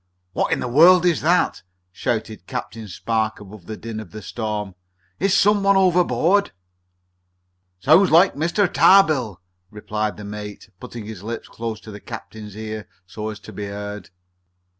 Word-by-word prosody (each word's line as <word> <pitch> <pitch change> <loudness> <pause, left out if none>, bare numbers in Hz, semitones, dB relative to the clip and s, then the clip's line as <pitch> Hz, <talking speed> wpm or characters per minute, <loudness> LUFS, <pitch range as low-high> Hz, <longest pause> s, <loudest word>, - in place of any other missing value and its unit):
"What - - 0
in - - 0
the - - -2
world 170 +8 +6
is 170 -4 +2
that?" 175 +4 +2 0.3
shouted 110 -1 -3
Captain 115 -3 -6
Spark 110 +3 -2
above 105 -3 -13
the 110 - -6
din 115 -1 -6
of 110 -5 -9
the 105 +4 -10
storm. 105 -4 -4 0.5
"Is 195 +1 +1
some 205 +2 +4
one 195 0 +4
overboard?" 180 +1 +3 1.3
"Sounds 185 - +5
like 175 +4 +5
Mr. 170 +7 +1
Tarbill," 155 - +4 0.3
replied 105 0 -4
the 105 - -8
mate, 105 -1 -8
putting 115 -3 -8
his 105 -4 -8
lips 115 +2 -6
close 115 -1 -5
to 110 - -11
the 105 - -9
captain's 110 -2 -9
ear, 110 -2 -6 0.2
so 105 +4 -6
as 105 -1 -7
to - - -11
be 105 -1 -5
heard. 105 -1 -7
110 Hz, 160 wpm, -22 LUFS, 105-165 Hz, 1.3 s, world